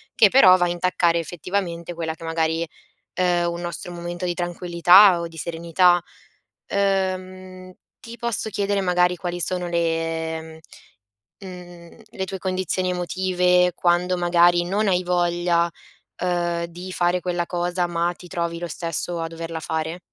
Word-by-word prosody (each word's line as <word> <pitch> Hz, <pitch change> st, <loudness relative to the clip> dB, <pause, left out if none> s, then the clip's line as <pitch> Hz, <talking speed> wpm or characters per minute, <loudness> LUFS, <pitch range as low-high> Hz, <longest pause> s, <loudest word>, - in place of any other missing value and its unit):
che 210 Hz, -, +6 dB
però 190 Hz, -6 st, +7 dB
va 175 Hz, -, +2 dB
a -, -, 0 dB
intaccare 175 Hz, -1 st, +1 dB
effettivamente 175 Hz, 0 st, -4 dB
quella 165 Hz, -1 st, -4 dB
che 165 Hz, -, -14 dB
magari 165 Hz, 0 st, -1 dB, 0.5 s
uhm, 175 Hz, -1 st, +1 dB
un 170 Hz, -, -6 dB
nostro 175 Hz, 0 st, -4 dB
momento 175 Hz, +1 st, -6 dB
di 175 Hz, -, -1 dB
tranquillità 175 Hz, +2 st, +5 dB
o 170 Hz, -, -3 dB
di 165 Hz, -, -15 dB
serenità. 170 Hz, +3 st, +2 dB, 0.7 s
Uhm, 185 Hz, -1 st, -2 dB, 0.3 s
ti 230 Hz, +1 st, -10 dB
posso 235 Hz, -2 st, -1 dB
chiedere 200 Hz, -1 st, -1 dB
magari 180 Hz, -1 st, +2 dB
quali 175 Hz, 0 st, -5 dB
sono 180 Hz, 0 st, 0 dB
le 165 Hz, -1 st, -2 dB, 0.8 s
mhmm, 195 Hz, -, -10 dB
mhmm, 175 Hz, -1 st, -12 dB
le 190 Hz, -, -4 dB
tue 190 Hz, 0 st, -5 dB
condizioni 185 Hz, -1 st, -1 dB
emotive 180 Hz, 0 st, +1 dB
quando 180 Hz, +1 st, +1 dB
magari 175 Hz, 0 st, +4 dB
non 200 Hz, +4 st, 0 dB
hai 180 Hz, -1 st, +2 dB
voglia, 175 Hz, -1 st, +1 dB, 0.5 s
uhm, 175 Hz, -1 st, -1 dB
di 175 Hz, +2 st, -9 dB
fare 175 Hz, 0 st, +1 dB
quella 175 Hz, -1 st, -2 dB
cosa, 175 Hz, 0 st, -1 dB
ma 175 Hz, 0 st, -1 dB
ti 180 Hz, -, -14 dB
trovi 170 Hz, -1 st, -3 dB
lo 175 Hz, 0 st, -5 dB
stesso 170 Hz, +1 st, -3 dB
a 165 Hz, -, -3 dB
doverla 165 Hz, 0 st, -6 dB
fare? 160 Hz, +2 st, -3 dB
175 Hz, 150 wpm, -22 LUFS, 170-185 Hz, 0.8 s, però